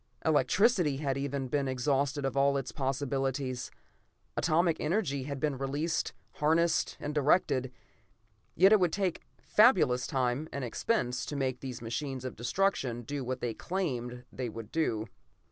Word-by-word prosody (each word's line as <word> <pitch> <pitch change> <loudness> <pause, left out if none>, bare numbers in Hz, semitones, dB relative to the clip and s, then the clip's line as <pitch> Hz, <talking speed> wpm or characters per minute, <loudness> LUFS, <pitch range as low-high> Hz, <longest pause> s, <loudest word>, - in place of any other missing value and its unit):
Electricity 160 - +3
had 140 -2 -1
even 140 0 -2
then - - -4
been 140 +1 0
exhausted 135 +2 0
of 135 - -2 0.2
its 135 - -4
possibilities. 135 -2 -2 0.7
Atomic 165 0 +2
energy 150 -6 0
had 140 -1 -4
been 140 -2 -1
released, 145 +4 -1 0.3
harnessed, 160 +2 +2
and 150 - -4
directed. 140 -3 +2 0.8
Yet 190 +4 +6
it 215 - +7
would 180 -3 +2
take 190 -4 -1 0.2
fabulous 175 - +4
time 130 +4 -1
and 140 - -4
expense 125 - -1
to 150 - -4
make 130 -2 -1
these 125 -3 -6
machines 130 +2 -4
of 130 - -5
destruction 125 -4 0
do 140 +3 -4
what 130 +1 -3
they 120 -2 -1
claimed 125 - -3
they 125 -2 -3
would 115 0 -8
do. 115 -10 0
140 Hz, 145 wpm, -30 LUFS, 130-155 Hz, 0.8 s, it